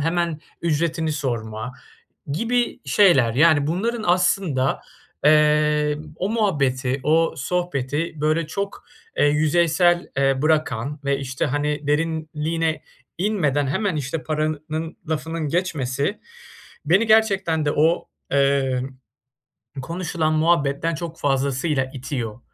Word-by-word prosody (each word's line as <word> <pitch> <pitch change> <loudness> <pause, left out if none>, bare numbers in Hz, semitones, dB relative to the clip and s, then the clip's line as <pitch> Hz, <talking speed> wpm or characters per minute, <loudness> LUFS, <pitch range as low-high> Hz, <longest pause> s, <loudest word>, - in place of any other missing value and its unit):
hemen 165 0 -1 0.2
ücretini 160 0 0
sorma 120 -5 -4 0.6
gibi 235 +7 0
şeyler 135 - +4
yani 150 0 +4
bunların 220 +8 -1
aslında, 175 -6 +1 0.4
eee, 150 0 +3 0.2
o 185 - -2
muhabbeti, 140 - 0
o 160 +3 +2
sohbeti 150 -1 -2
böyle 155 +2 +1
çok, 200 +5 -5 0.3
eee, - - +4
yüzeysel, 170 +3 +2
eee, 135 0 +2
bırakan 150 -3 0
ve, 140 0 +1
işte, 130 -1 -2
hani, 145 +1 -2
derinliğine 160 +1 -1 0.4
inmeden 160 -8 +1
hemen 185 +6 -1
işte 150 +2 -3
paranın 155 +1 -3
lafının 160 0 -2
geçmesi, 145 - -1 0.7
beni 190 +8 +4
gerçekten 195 -8 +3
de 145 - +1
o, 160 +3 +2 0.2
eee, 135 -2 +2 1.0
konuşulan 165 0 -2
muhabbetten 155 0 +1
çok 165 0 -7
fazlasıyla 135 +1 0
itiyor 125 -4 -5
155 Hz, 105 wpm, -22 LUFS, 140-170 Hz, 1.0 s, şeyler